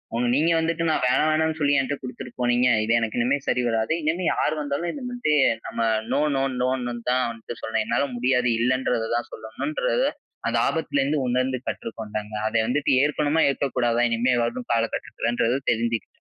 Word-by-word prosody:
ஒண்ணு 120 +1 +1
நீங்க 160 +4 +3
வந்துட்டு, 165 +1 -1
நான் 155 - +1
வேணா, 125 - +3
வேணான்னு 160 0 +1
சொல்லி, 145 -1 +2
என்ட்ட 135 +1 -1
கொடுத்துட்டு 125 -1 -8
போனீங்க. 120 +1 +3 0.2
இது 115 +1 +1
எனக்கு 115 0 -2
இனிமே 130 +4 +2
சரி 125 - +1
வராது." 115 +3 0
இனிமே 170 +4 0
யார் 155 - 0
வந்தாலும் 145 +4 -2
இதுமாதிரி 245 - -1 0.3
நம்ம - - -6 0.3
நோ - - +2 0.2
நோ 135 - +1 0.2
நோன்னு 125 -1 -1 0.2
தான் 130 0 +2
வந்துட்டு 115 0 -9
சொல்லணும். 110 0 -1
என்னால 115 +5 +1
முடியாது. 125 0 +2
இல்லன்றத 125 -1 +1
தான் 120 - -2
சொல்லணுன்றத - - -2 0.4
அந்த - - +1
ஆபத்துலேருந்து 145 -2 0
உணர்ந்து 130 +1 0
கற்றுக்கொண்டேங்க. 110 -2 -5
அத - - -4
வந்துட்டு 140 +3 +1
ஏற்கணுமா! 150 +1 +1
ஏற்கக்கூடாதா! 120 -4 0
இனிமே 120 +2 +1
வரும் 120 +1 -4
கால 115 -1 +3
கட்டத்துலன்றது 120 +1 -1
தெரிஞ்சுக்கிட்டேன். 115 0 -1
125 Hz, 160 wpm, -24 LUFS, 115-150 Hz, 0.4 s, நீங்க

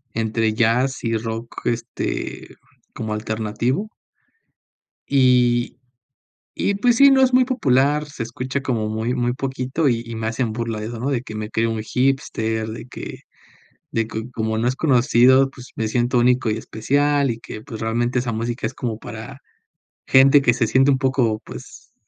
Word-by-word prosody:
entre 110 0 0
jazz 120 +4 +1
y 115 -1 0
rock, 115 +1 -6
este, 115 0 -3 0.4
como 110 -1 -4
alternativo. 110 - -2 1.2
Y 125 -3 +3 0.8
y 200 - 0
pues 235 +3 +2
sí, 280 +2 +8
no 270 -1 +5
es 260 -1 +3
muy 255 0 +5
popular, 150 - +2
se 150 - -9
escucha 130 +4 -4
como 115 -6 -1
muy 110 +3 -2
muy 120 -1 0
poquito 135 +3 -1
y 115 -1 0
y 115 0 -7
me 110 0 -3
hacen 115 0 -1
burla 115 -1 -3
de 105 - -5
eso, 115 0 -6
¿no? 130 +4 -2
De 130 -4 0
que 110 - -8
me 105 0 -4
creo 115 +1 0
un 110 -1 -3
hipster, 115 -4 -1
de 110 +1 -7
que - - -8 0.7
de 115 -1 0
que 110 +2 -6
como 110 -1 -2
no 115 - 0
es 125 - 0
conocido, 130 -1 +4
pues 125 -2 -13
me 110 -1 -1
siento 120 +2 +1
único 125 -1 +3
y 105 - -1
especial 140 +5 +1
y 115 - -9
que, 110 - -8
pues, 110 0 -8
realmente 120 +2 0
esa 120 -1 -3
música 115 +3 -3
es 115 - -4
como 115 -4 -4
para 115 +5 -8 0.7
gente 135 +2 +6
que 120 -3 +3
se 115 -1 0
siente 130 +5 +4
un 135 - +3
poco 130 -5 +1
pues - - -11
120 Hz, 175 wpm, -21 LUFS, 110-135 Hz, 1.2 s, sí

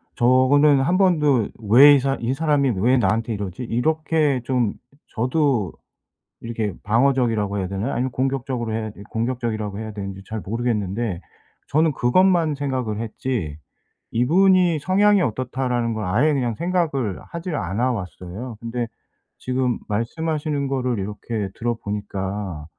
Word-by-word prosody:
저는 130 +4 +4
1 175 +7 +2
번도 150 - +3 0.2
'왜 140 +6 +9
이 - - +3
사 135 +1 0
이 120 +2 -1
사람이 145 -2 +2
왜 125 +7 +3
나한테 115 +1 +1
이러지?' 100 +1 -5
이렇게 150 +3 +1
좀 125 -5 +1 0.3
저도 125 - 0 0.7
이렇게 115 -3 -3
방어적이라고 115 -3 +1
해야 95 -2 -2
되나요? 100 +7 -3
아니면 130 +2 -1
공격적으로 130 -3 -2
해야 110 0 -2
이 100 - -11
공격적이라고 115 -3 -2
해야 110 0 -5
되는지 100 -2 -7
잘 110 - -4
모르겠는데 105 -2 -2 0.5
저는 155 +2 +2
그것만 165 +5 +3
생각을 130 -6 -2
했지 110 - -3 0.5
'이분이 175 +6 +4
성향이 200 +5 +3
어떻다.'라는 125 -2 -1
걸 110 -1 -3
아예 125 +12 +2
그냥 120 -5 -1
생각을 155 - -1
하지를 170 -2 -5
않아 105 +7 0
왔어요. 100 +2 -6
근데 115 0 -3 0.5
지금 125 -1 -1
말씀하시는 145 +6 -2
거를 125 -5 -1
이렇게 105 +1 -4
들어보니까 100 -6 -4
120 Hz, 320 characters per minute, -22 LUFS, 105-140 Hz, 0.7 s, 왜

